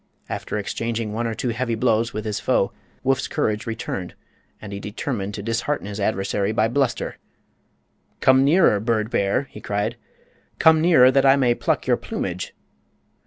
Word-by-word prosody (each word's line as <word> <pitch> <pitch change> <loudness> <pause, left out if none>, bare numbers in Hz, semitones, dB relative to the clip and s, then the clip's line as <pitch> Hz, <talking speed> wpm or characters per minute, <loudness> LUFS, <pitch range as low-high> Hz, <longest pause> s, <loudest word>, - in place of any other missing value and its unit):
After - - -4
exchanging 110 +1 -3
one 115 +2 -1
or 115 - -3
two 125 - -2
heavy 120 0 -1
blows 115 0 +1
with 110 0 -5
his 105 -2 -2
foe 115 -4 +1 0.3
Woof's 135 0 +1
courage 110 +1 -1
returned, 110 -5 -4 0.4
and 105 -2 -8
he 100 - -5
determined 105 -1 -4
to 100 - -6
dishearten 115 +5 -1
his 105 0 -6
adversary 100 0 0
by 110 0 +2
bluster. 135 +1 -1 1.0
"Come 130 0 +5
nearer, 145 - +4
bird 110 0 -1
bear!" 100 +7 +1
he 105 - -10
cried. 105 0 -2 0.6
"Come 160 -1 +5
nearer, 155 -7 +6
that 135 0 +3
I 135 0 +6
may 130 -4 +3
pluck - - -1
your - - +3
plumage!" - - -5
115 Hz, 165 wpm, -23 LUFS, 105-130 Hz, 1.0 s, nearer